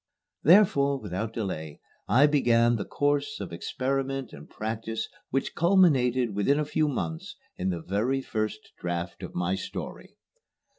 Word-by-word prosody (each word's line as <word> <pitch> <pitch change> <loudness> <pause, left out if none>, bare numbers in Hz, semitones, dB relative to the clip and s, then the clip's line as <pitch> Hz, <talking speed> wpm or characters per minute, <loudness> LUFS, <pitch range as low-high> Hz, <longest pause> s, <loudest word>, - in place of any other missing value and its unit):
Therefore, 140 -6 +5
without 105 +1 -4
delay, 85 -9 -4 0.3
I 130 +7 +5
began 120 -5 +3
the 100 - -4
course 145 0 0
of 95 -4 -6
experiment 135 +7 -2
and 70 +1 -11
practice 110 +1 -4 0.2
which 135 +1 -1
culminated 130 - +3
within 105 +8 +2
a 150 - 0
few 155 +1 +1
months 85 - -4 0.2
in 95 - -2
the 100 +10 -1
first 110 -1 -3
draft 85 0 -4
of 90 - -8
my 90 +1 0
story. 95 - -6
115 Hz, 135 wpm, -27 LUFS, 95-140 Hz, 0.3 s, Therefore